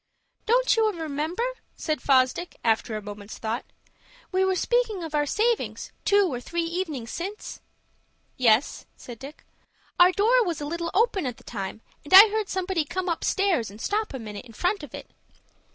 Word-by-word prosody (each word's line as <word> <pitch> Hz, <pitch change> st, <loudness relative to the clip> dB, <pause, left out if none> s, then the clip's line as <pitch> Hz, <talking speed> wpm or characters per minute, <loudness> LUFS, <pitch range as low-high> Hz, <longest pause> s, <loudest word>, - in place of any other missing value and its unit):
"Don't -, -, +4 dB
you 440 Hz, -1 st, +3 dB
remember?" 315 Hz, +6 st, -2 dB, 0.3 s
said 310 Hz, -2 st, -2 dB
Fosdick, 265 Hz, +6 st, +2 dB
after 225 Hz, -1 st, +1 dB
a 210 Hz, -, -8 dB
moment's 205 Hz, 0 st, -9 dB
thought, 225 Hz, +2 st, -3 dB, 0.7 s
"we 375 Hz, 0 st, +2 dB
were 380 Hz, 0 st, +2 dB
speaking 450 Hz, -3 st, 0 dB
of 320 Hz, -2 st, -7 dB
our 295 Hz, -1 st, +1 dB
savings, 455 Hz, -, -1 dB
two 405 Hz, -1 st, +4 dB
or 245 Hz, -, -4 dB
three 340 Hz, +5 st, -2 dB
evenings 330 Hz, -9 st, -4 dB
since?" 395 Hz, +5 st, -6 dB, 0.7 s
"Yes," 235 Hz, 0 st, +2 dB
said 240 Hz, -3 st, -10 dB
Dick. 275 Hz, +3 st, -11 dB, 0.5 s
"Our 355 Hz, +1 st, +8 dB
door 465 Hz, +6 st, +3 dB
was 345 Hz, -6 st, -3 dB
a 295 Hz, -, -4 dB
little 335 Hz, +2 st, -3 dB
open 400 Hz, -, +2 dB
at 245 Hz, -, -5 dB
the -, -, -18 dB
time, 200 Hz, -1 st, -6 dB, 0.2 s
and 295 Hz, -, +3 dB
I 415 Hz, +3 st, +11 dB
heard 430 Hz, -1 st, -2 dB
somebody 375 Hz, -3 st, -1 dB
come 370 Hz, +5 st, -4 dB
upstairs, 340 Hz, -, 0 dB
and 205 Hz, +2 st, -13 dB
stop 425 Hz, -, -1 dB
a 265 Hz, -, -5 dB
minute 210 Hz, -3 st, -8 dB
in 230 Hz, -, -14 dB
front 360 Hz, -, 0 dB
of 295 Hz, -5 st, -9 dB
it. -, -, -10 dB
335 Hz, 175 wpm, -25 LUFS, 250-395 Hz, 0.7 s, I